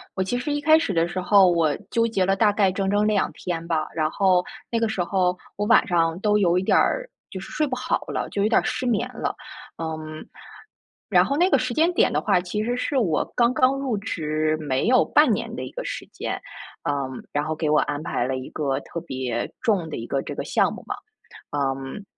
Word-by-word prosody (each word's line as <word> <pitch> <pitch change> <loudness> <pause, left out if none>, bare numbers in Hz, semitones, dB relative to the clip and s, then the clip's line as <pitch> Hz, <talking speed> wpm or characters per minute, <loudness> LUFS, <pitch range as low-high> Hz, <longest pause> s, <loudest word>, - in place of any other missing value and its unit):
我 190 - 0
其 245 +6 -2
实 290 +4 -3
一 290 - 0
开 315 +2 +5
始 320 - -1
的 165 0 +2
时 185 +1 -3
候 195 0 +6
我 160 -4 +2 0.2
纠 230 0 +2
结 195 -5 +1
了 195 +1 +2
大 210 +1 +4
概 200 -2 +2
整 195 0 -1
整 205 +1 +2
2 210 -2 +1
天 170 -2 -4
吧， 155 -2 0
然 155 -1 +1
后 185 -1 +3 0.3
那 230 - +1
个 225 -1 +1
时 185 -5 -1
候 180 -1 +1 0.2
我 205 - -1
晚 - - +5
上 165 -1 +1
都 210 -1 +3
有 180 -2 +3
一 185 - +1
点 - - +2
儿 - - +1 0.2
就 190 - -6
是 - - -9
睡 305 -1 0
不 255 - -2
好 255 0 -1
了， - - -3
就 200 - -2
有 210 - +2
点 - - +5
儿 - - -5
失 250 0 -2
眠 225 -4 +1
了。 - - -3 0.4
嗯， 155 -1 -6 0.8
然 - - +5
后 280 - -1
那 355 - +4
个 275 - +5
时 255 -1 -2
间 330 +7 +2
点 - - +3
的 - - +1
话， 180 - +2
其 200 +4 -3
实 240 +2 -1
是 270 +3 -1
我 175 - +2
刚 240 0 +3
刚 255 +1 +3
入 265 -5 -1
职 155 -6 -1
没 140 +3 -1
有 255 +1 +5
半 - - +4
年 - - -2
的 - - -5
一 - - -7
个 - - -6
时 - - -5
间， - - -4 0.5
嗯， 135 -3 -3
然 145 +1 -1
后 155 0 -2
给 155 -1 -1
我 150 - +4
安 145 0 -2
排 120 - -1
了 130 +1 -2
一 130 - -7
个 140 -2 -1
特 170 - -7
别 130 -6 -3
重 195 -8 +1
的 150 - -5
一 115 - -6
个 135 - 0
这 - - -6
个 - - -4
项 - - +1
目 - - -10
嘛。 - - -3 0.6
嗯， 135 +6 -3
185 Hz, 255 characters per minute, -24 LUFS, 155-230 Hz, 0.8 s, 候